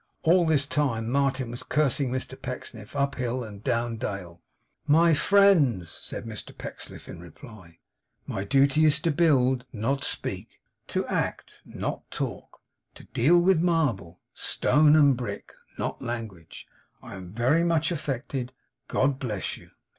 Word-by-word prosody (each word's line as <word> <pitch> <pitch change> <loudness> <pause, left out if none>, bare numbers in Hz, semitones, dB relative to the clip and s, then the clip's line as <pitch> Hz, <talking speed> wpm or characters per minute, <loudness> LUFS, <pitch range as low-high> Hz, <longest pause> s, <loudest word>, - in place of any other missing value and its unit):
All 170 +1 +4
this 145 -3 +2
time, 125 -6 -1
Martin 135 -3 0
was 120 - -6
cursing 140 -1 +1
Mr 130 0 -3
Pecksniff 125 -3 -7
up 140 0 +1
hill 125 -1 -2
and 105 -2 -10
down 115 0 -1
dale. 90 -5 -6 0.5
'My 165 +3 +5
friends!' 150 - +4
said - - -6
Mr 110 -3 -7
Pecksniff, - - -7
in - - -9
reply. 90 - -13 0.5
'My 95 - -3
duty 140 +7 +3
is 155 -2 +5
to 165 - +1
build, 130 -5 +3
not 125 +5 -1
speak; - - -4 0.3
to - - -1
act, - - -3
not - - -5
talk; - - -6 0.3
to - - -12
deal 160 +9 +3
with 175 -1 +3
marble, 135 - 0
stone, 150 +2 +3
and 145 -3 +6
brick; 110 -5 -6 0.2
not - - -3
language. 110 -9 -6 0.4
I - - -9
am 95 -2 -9
very 130 - +2
much 165 -1 +1
affected. 135 -4 -3 0.3
God 135 0 +1
bless 110 -8 -3
you! - - -16
130 Hz, 145 wpm, -26 LUFS, 115-150 Hz, 0.5 s, and